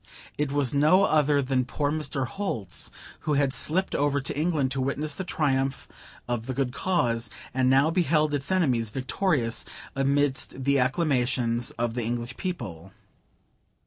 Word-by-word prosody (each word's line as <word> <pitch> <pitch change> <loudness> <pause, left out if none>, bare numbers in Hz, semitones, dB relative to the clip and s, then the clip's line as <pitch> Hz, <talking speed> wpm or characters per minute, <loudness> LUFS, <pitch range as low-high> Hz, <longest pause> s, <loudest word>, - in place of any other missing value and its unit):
It 145 -2 -1
was 140 -3 +1
no 155 +7 +5
other 150 -5 +3
than 130 -1 +1
poor 145 +3 -1
Mr. 140 -3 -2
Holt's, 120 - -4 0.3
who 150 - -1
had 140 -2 +2
slipped 170 +9 0
over 145 0 +1
to 140 - -3
England 150 -4 +1
to 135 - 0
witness 140 +3 -1
the 190 - -4
triumph 135 -5 0 0.4
of 120 -1 -2
the 130 - -3
good 130 -2 -1
cause; 120 - 0 0.2
and 130 0 +2
now 135 +4 +4
beheld 160 -4 +2
its 145 +4 -2
enemies 130 - +2
victorious, 130 - 0 0.3
amidst 135 -1 +1
the 140 +1 +3
acclamations 125 -4 +1
of 120 -1 -1
the 120 - -2
English 120 +2 -3
people. 95 - -5
135 Hz, 150 wpm, -26 LUFS, 125-150 Hz, 0.4 s, no